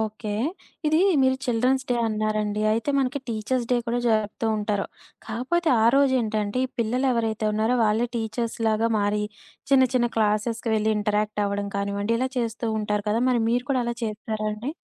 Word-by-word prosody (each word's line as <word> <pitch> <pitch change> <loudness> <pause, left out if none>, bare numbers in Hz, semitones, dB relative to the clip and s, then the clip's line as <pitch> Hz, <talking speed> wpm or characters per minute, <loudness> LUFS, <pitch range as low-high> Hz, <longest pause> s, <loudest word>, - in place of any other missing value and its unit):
Okay. 215 0 -3 0.5
ఇది 310 +1 +3 0.2
మీరు 260 0 +3
children's 255 +2 +1
day - - +3
అన్నారండి. 215 -1 -1
అయితే 230 +6 0
మనకి 270 +1 0
టీచర్స్ 235 +2 -1
డే - - +4
కూడా 235 +1 0
జరుపుతూ 215 0 0
ఉంటారు. 205 -1 -1 0.4
కాకపోతే 260 +10 -1
ఆ - - +5
రోజు 275 -1 +4
ఏంటంటే, 215 0 -1
ఈ - - -19
పిల్లలు 250 +4 0
ఎవరైతే 225 -2 -1
ఉన్నారో 220 +4 +1
వాళ్ళే 220 +3 +2
టీచర్స్ 230 +1 -3
లాగా 220 +1 +2
మారి 205 +1 0 0.5
చిన్న, 270 -1 +6
చిన్న 240 -1 +3
క్లాసెస్‌కి 225 +2 0
వెళ్లి 220 0 +2
ఇంటరాక్ట్ 210 0 0
అవ్వడం 200 0 -2
కానివ్వండి 200 +2 -1
ఇలా 260 +2 0
చేస్తూంటారు 220 -3 -1
కదా! 220 +2 +1
మరి 245 -2 +2
మీరు 245 +1 +1
కూడా 260 -2 +2
అలా 235 0 -2
చేస్తారా 215 0 -3
అండి? 220 +6 -4
220 Hz, 165 wpm, -25 LUFS, 210-245 Hz, 0.5 s, చిన్న